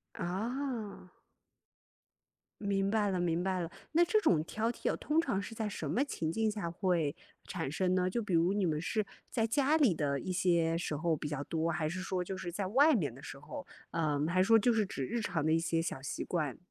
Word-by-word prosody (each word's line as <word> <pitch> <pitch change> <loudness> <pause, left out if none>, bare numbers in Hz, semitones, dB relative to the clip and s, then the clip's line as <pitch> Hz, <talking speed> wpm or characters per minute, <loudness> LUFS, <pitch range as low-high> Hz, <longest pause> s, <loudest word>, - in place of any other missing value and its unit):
啊。 220 0 -3 1.5
明 195 -1 +1
白 210 -2 +2
了 185 - 0
明 175 0 +1
白 185 -1 0
了， 170 -1 -3 0.2
那 340 +2 +5
这 425 +5 +3
种 155 - +3
挑 225 +6 -1
剔 - - -1
啊， - - -3
通 310 +2 +1
常 240 -12 0
是 225 - -7
在 220 -1 -2
什 155 -7 -4
么 255 - +2
情 160 - -3
境 220 +4 +1
下 205 -6 -3
会 170 -5 0 0.3
产 135 - -3
生 185 +3 +1
呢？ 185 0 +2
就 230 +5 -1
比 190 -4 -2
如 170 +3 +4
你 200 -2 +1
们 155 -2 0
是 215 +4 0 0.3
在 225 -2 +1
家 285 +5 +3
里 260 - +4
的 140 -3 0
一 185 - -5
些 170 -2 +2
时 155 - -2
候 160 +1 +1
比 150 - -4
较 145 -1 -3
多？ 165 0 -1
还 160 -2 -1
是 185 +3 -4
说 185 -1 -2
就 190 +1 -4
是 175 -2 -5
在 195 +1 -2
外 285 +7 +5
面 155 - 0
的 135 +3 -13
时 135 - -8
候？ 150 +2 -8 0.2
呃， 150 -3 0
还 185 +2 +3
是 - - +3
说 225 0 +7
就 240 +3 +3
是 215 -3 +2
指 135 -7 -4
日 235 - -2
常 165 -7 -1
的 160 - +3
一 165 - +4
些 165 0 0
小 135 - -3
习 135 - -4
惯？ 155 -7 -1
185 Hz, 250 characters per minute, -32 LUFS, 165-220 Hz, 1.5 s, 说